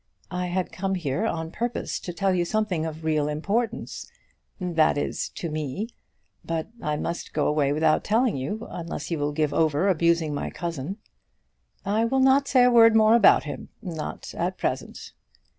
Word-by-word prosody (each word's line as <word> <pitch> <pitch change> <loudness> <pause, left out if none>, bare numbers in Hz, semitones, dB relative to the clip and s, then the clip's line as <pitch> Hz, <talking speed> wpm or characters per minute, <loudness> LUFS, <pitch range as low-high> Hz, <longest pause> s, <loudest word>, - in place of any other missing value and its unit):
I 180 0 -2
had 180 +1 -2
come 195 0 -2
here 175 +5 -1
on 160 -5 -3
purpose 240 +5 -3
to 175 - -6
tell 195 +2 0
you 175 -1 +2
something 180 -4 -1
of 160 0 -7
real 155 -2 +1
importance, 210 +10 -2 0.5
that 170 -5 +2
is, 145 - -2
to 170 - -4
me; 155 - -3 0.5
but 165 +1 -3
I 150 0 -1
must 170 +3 -4
go 150 -2 +1
away 150 -2 +2
without 155 +1 +2
telling 230 +2 +2
you, 175 - -4
unless 170 0 -5
you 165 - -1
will 145 0 0
give 150 0 0
over 160 +3 +2
abusing 170 -3 +2
my 145 - -3
cousin." 170 +1 -5 0.9
"I 215 +3 +2
will 265 +3 +1
not 270 +1 +4
say 255 -3 +5
a 250 - +5
word 230 -1 +7
more 220 0 +6
about 230 -4 +6
him, 150 - -7
not 170 -8 -6
at - - -2
present." - - -4
175 Hz, 175 wpm, -25 LUFS, 155-215 Hz, 0.9 s, word